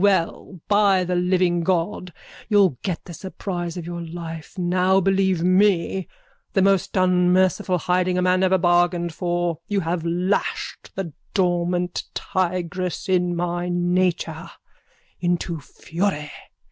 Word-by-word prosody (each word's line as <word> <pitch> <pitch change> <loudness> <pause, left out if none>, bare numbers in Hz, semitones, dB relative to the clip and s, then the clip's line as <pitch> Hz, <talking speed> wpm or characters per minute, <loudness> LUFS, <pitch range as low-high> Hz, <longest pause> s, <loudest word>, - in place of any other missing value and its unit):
Well, 190 -1 +1
by 200 -3 +4
the 180 0 -2
living 180 -1 +2
God, 180 +1 -1 0.4
you'll 195 - +4
get 180 -4 -3
the 175 - -9
surprise 175 -1 -5
of 175 - -5
your 170 0 -5
life 165 0 -8
now, 185 +1 +2
believe 190 -2 +2
me, 185 -1 +2 0.5
the 195 - +3
most 195 0 +2
unmerciful 185 +1 +3
hiding 180 +2 +1
a - - +2
man 185 0 +3
ever 190 0 +4
bargained 175 -1 +2
for. 175 -1 -1
You 205 -1 0
have 165 0 -2
lashed 180 +4 -2
the 180 -5 -4 0.2
dormant 175 -1 0
tigress 185 0 -2
in 180 -2 +1
my 175 +1 -2
nature 175 -1 0 0.7
into 175 -2 -1
fury. 160 +1 -3
180 Hz, 125 wpm, -23 LUFS, 175-185 Hz, 0.7 s, by